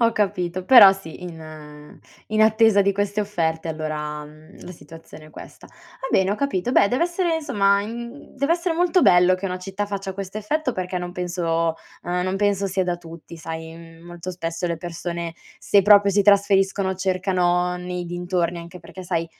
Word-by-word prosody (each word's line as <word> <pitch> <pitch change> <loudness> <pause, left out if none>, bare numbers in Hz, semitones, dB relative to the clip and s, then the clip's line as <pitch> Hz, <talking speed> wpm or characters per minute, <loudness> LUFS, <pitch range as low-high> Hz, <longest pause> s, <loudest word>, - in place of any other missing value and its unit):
Ho 230 -1 +3
capito, 185 -4 -2
però 205 -6 +9
sì, 190 -3 -10
in 155 -3 -11 0.3
in 215 0 +3
attesa 220 -2 +4
di 200 - +2
queste 205 +1 -1
offerte 165 -5 -2
allora, 155 -1 -4
mhmm, 155 +5 -16
la 180 - -8
situazione 165 -2 -14
è - - -16
questa. - - -13
Va 265 - -11
bene, 190 0 +2
ho - - +1
capito. 240 -3 -2
Beh, 200 - +4
dev'essere 340 - 0
insomma, 200 -10 +1
in 220 +3 -6
mhmm, 285 +2 -15
dev'essere 335 +5 0
molto 355 +2 +2
bello 180 - +5
che 185 +2 -4
una 185 -1 -4
città 195 +2 -4
faccia 195 -1 -5
questo 195 +1 -7
effetto 265 +6 -2
perché 185 -2 -3
non 175 0 -6
penso 170 -2 -1 0.3
uhm, 180 +1 -2
non 185 +1 -2
penso 200 -1 +1
sia 190 0 -1
da 175 -1 -1
tutti, 170 -1 -12
sai, 160 0 -7
mhmm, 165 0 -14
molto 175 +1 -7
spesso 170 -1 -4
le 170 -1 -2
persone 170 0 -5 0.2
se 200 - +3
proprio 200 0 +6
si 205 +1 +3
trasferiscono 195 -1 +3
cercano 180 -1 0
nei 180 0 -5
dintorni, 175 0 -2
anche 170 +1 -10
perché 185 +3 -11
sai, 170 -2 -2
185 Hz, 185 wpm, -22 LUFS, 170-200 Hz, 0.3 s, però